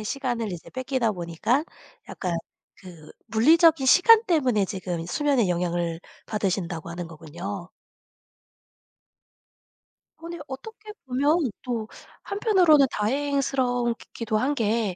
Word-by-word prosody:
에 - - -7
시간을 240 -4 -2
이제 175 - -9
뺏기다 260 -3 -1
보니까 175 - -1 0.4
약간 180 -3 -3 0.4
그 170 -5 -13 0.2
물리적인 315 +5 +5
시간 440 - +7
때문에 260 - +2
지금 180 -3 -4
수면에 270 -2 +1
영향을 170 -1 -1 0.3
받으신다고 185 -5 -2
하는 170 0 -5
거군요. 175 +4 -7 2.5
아니 335 +1 -8
어떻게 425 +11 -9
보면 280 +2 +1
또 230 -3 -3 0.4
한편으로는 375 - +4
다행스럽기도 245 -3 -1
한 265 +6 +1
게 220 -5 0
235 Hz, 255 characters per minute, -25 LUFS, 185-285 Hz, 2.5 s, 시간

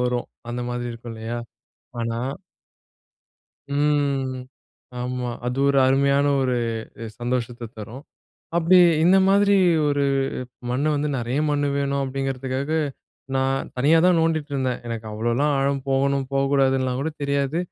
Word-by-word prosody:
வரும். 125 -1 -1 0.2
அந்த 120 +1 -3
மாதிரி 120 0 -3
இருக்கும் 115 0 -9
இல்லையா? 115 +2 -5 0.6
ஆனா 115 0 -2 1.6
ம், 140 -3 +1 0.7
ஆமா. 125 0 -3 0.2
அது 125 +2 -2
ஒரு 140 -1 +3
அருமையான 140 +1 +3 0.2
ஒரு 125 -1 +1 0.6
சந்தோஷத்த 120 -1 -3
தரும். 115 +6 -8 0.6
அப்டி 175 +2 +5 0.2
இந்த 185 +3 +6
மாதிரி 200 0 +4 0.3
ஒரு 145 -1 +1 0.7
மண்ணு 140 +5 0
வந்து 150 +1 0
நெறைய 120 +3 -2
மண்ணு 145 0 +1
வேணும் 140 0 0
அப்டிங்கிறதுக்காக 135 +1 -3 0.6
நான் 135 0 0
தனியா 150 +6 +4
தான் 180 -2 +4
நோண்டிட்டு 160 -2 0
இருந்தேன். 130 -2 -1
எனக்கு 115 -1 -5
அவ்ளோலாம் 120 +7 0
ஆழம் 140 0 +1
போகணும் 135 0 +1
போகக்கூடாதுன்னுலாம் 135 -2 +1
கூட 160 +3 -1
தெரியாது. 140 +2 0
135 Hz, 120 wpm, -23 LUFS, 125-145 Hz, 1.6 s, இந்த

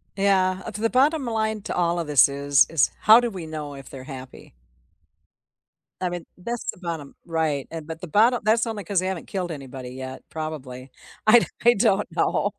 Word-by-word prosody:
Yeah, 190 -1 +2
uh, - - -4
to 210 +1 -7
the 225 - +1
bottom 280 +3 +3
line 220 -2 -1
to - - -4
all 175 -1 +1
of 165 - -2
this 145 -2 +5
is, 140 0 +3
is 160 -6 +2
how 220 +2 +8
do 240 -2 -1
we 180 -4 -7
know 150 -2 -6
if 135 -1 -11
they're 130 -1 -9
happy? 130 - -10 1.5
I 180 - 0
mean, 175 -1 -6
that's 235 +6 -5
the - - -18
bottom 165 -5 -5
Right, 160 -5 -1
and 160 -2 -7
but 160 0 -7
the 180 - -6
bottom 230 +8 +3
that's 225 +2 +3
only 215 -3 -4
cause 190 +1 0
they 185 - -2
haven't 190 -3 -4
killed 180 -3 -3
anybody 135 -3 -7
yet, 130 +1 -8
probably. 135 -5 -6 0.4
I 240 +2 +9
do - - -1 0.2
I 240 - +8
don't 205 -2 +2
know. 205 - +1
175 Hz, 205 wpm, -24 LUFS, 145-210 Hz, 1.5 s, I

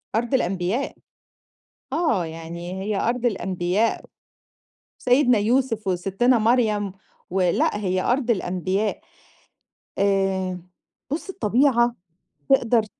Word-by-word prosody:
أرض 235 +4 -1
الأنبياء، 195 +1 0 1.0
آه، 285 - +1
يعني 170 +3 -7
هي 210 0 -1
أرض 245 +1 0
الأنبياء، 190 0 0 0.9
سيدنا 250 -2 +4
يوسف، 225 0 +1
وسِتِّنا 195 +7 +2
مريم، 215 -3 +2 0.4
و 190 +2 0
لأ 180 +3 +2
هي 185 -3 0
أرض 245 0 +1
الأنبياء، 190 0 -1 1.0
آآ، 195 -2 +1 0.5
بُصّ 325 +6 -3
الطبيعة 240 - +2 0.5
تقدر 235 -4 +3
210 Hz, 90 wpm, -23 LUFS, 185-245 Hz, 1.0 s, سيدنا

